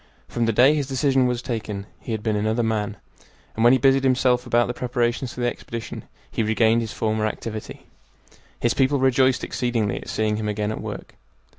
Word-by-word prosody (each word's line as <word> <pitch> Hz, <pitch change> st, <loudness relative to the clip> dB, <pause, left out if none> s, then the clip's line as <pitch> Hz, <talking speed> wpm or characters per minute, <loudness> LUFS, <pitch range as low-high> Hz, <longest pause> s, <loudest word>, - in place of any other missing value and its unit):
From 115 Hz, -1 st, -1 dB
the -, -, +3 dB
day 125 Hz, +7 st, +5 dB
his 145 Hz, -3 st, -1 dB
decision 135 Hz, -1 st, +2 dB
was 125 Hz, 0 st, -2 dB
taken 105 Hz, -5 st, -4 dB
he -, -, -7 dB
had 110 Hz, -2 st, -3 dB
been 110 Hz, -1 st, 0 dB
another 110 Hz, +3 st, 0 dB
man, 105 Hz, -2 st, -1 dB, 0.6 s
and 115 Hz, -, -1 dB
when 120 Hz, -, +7 dB
he 130 Hz, -, +6 dB
busied 135 Hz, +1 st, +3 dB
himself 125 Hz, -1 st, +2 dB
about 120 Hz, 0 st, +3 dB
the 120 Hz, -, -3 dB
preparations 120 Hz, 0 st, -1 dB
for 125 Hz, -, -7 dB
the -, -, +1 dB
expedition 115 Hz, -1 st, -6 dB, 0.3 s
he -, -, -1 dB
regained 110 Hz, +1 st, +3 dB
his 110 Hz, -2 st, -4 dB
former 110 Hz, -1 st, 0 dB
activity. 110 Hz, 0 st, -6 dB, 0.7 s
His 120 Hz, +1 st, +1 dB
people 140 Hz, +1 st, +2 dB
rejoiced 130 Hz, 0 st, +3 dB
exceedingly 120 Hz, -5 st, -1 dB
at -, -, -8 dB
seeing 110 Hz, -1 st, 0 dB
him 110 Hz, -1 st, -3 dB
again 105 Hz, 0 st, -1 dB
at -, -, -5 dB
work. -, -, -7 dB
120 Hz, 195 wpm, -23 LUFS, 110-125 Hz, 0.7 s, when